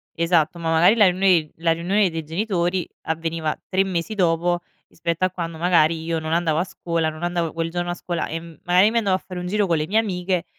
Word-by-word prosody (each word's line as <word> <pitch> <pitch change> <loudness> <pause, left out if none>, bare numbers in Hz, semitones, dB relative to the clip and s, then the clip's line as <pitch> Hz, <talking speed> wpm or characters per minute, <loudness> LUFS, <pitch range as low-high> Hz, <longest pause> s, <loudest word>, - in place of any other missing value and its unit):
Esatto, 170 0 +1
ma 165 - -2
magari 165 +5 +5
la 210 -5 +6
riunione 180 -4 +2
la 165 0 +1
riunione 180 +3 +1
dei 160 -1 -4
genitori 175 +1 -1 0.2
avveniva 160 -1 -2
3 190 0 +2
mesi 185 +1 -3
dopo 175 -2 +1 0.3
rispetto 170 +2 -2
a 185 - -1
quando 170 -3 -5
magari 165 -2 +2
io 165 0 -1
non 160 0 -3
andavo 165 -2 +1
a - - +2
scuola, 170 -3 -2
non 155 +2 -9
andavo 175 -2 -1
quel 165 0 -3
giorno 175 0 -2
a 175 - -2
scuola 175 0 -3
e 165 - -4
magari 175 +5 +2
mi 230 - +2
andavo 195 -4 +1
a 185 - -5
fare 185 -1 -6
un 180 - -5
giro 210 +2 +1
con 170 -3 +1
le 155 0 -2
mie 210 +4 +1
amiche, 185 -4 0
170 Hz, 225 wpm, -22 LUFS, 165-185 Hz, 0.3 s, la